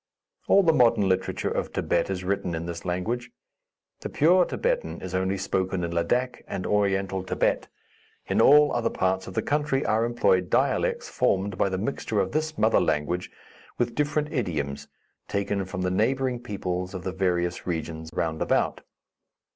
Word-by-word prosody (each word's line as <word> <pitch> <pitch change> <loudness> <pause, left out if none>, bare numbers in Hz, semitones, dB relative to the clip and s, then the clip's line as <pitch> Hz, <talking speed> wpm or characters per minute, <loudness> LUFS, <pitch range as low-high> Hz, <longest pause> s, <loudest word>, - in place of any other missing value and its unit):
All 200 - +6
the 165 -2 +4
modern 115 -7 +4
literature 95 0 0
of - - -1
Thibet - - 0
is 95 -1 -3
written 90 -2 -1
in 80 +1 -4
this 85 0 -6
language. 110 +8 -2 0.7
The - - -5
pure 175 +4 +4
Thibetan - - -2
is 95 -1 -7
only 95 +1 0
spoken 95 -1 -1
in 85 - -2
Ladak 120 +10 0
and 90 - -4
Oriental 95 -2 +1
Thibet. 95 - 0 0.6
In - - +1
all 150 0 +6
other 120 - +1
parts 95 0 -1
of 95 - -8
the - - 0
country 145 -2 0
are 110 +1 +2
employed 100 -6 +2
dialects - - +1
formed 100 +1 0
by 100 - +1
the 95 - -2
mixture 110 0 -2
of 95 - 0
this 155 0 -2
mother 110 +1 +3
language 85 +5 -1 0.5
with 120 -1 0
different 150 +1 -1
idioms 75 - -2 0.4
taken 100 -1 -1
from 90 0 -4
the 90 - 0
neighboring 125 +5 +1
peoples 95 -5 -4
of 90 - -5
the 95 - -2
various 90 -2 -1
regions 80 -1 -4
round 80 -2 -2
about. - - +1
95 Hz, 165 wpm, -26 LUFS, 90-120 Hz, 0.7 s, All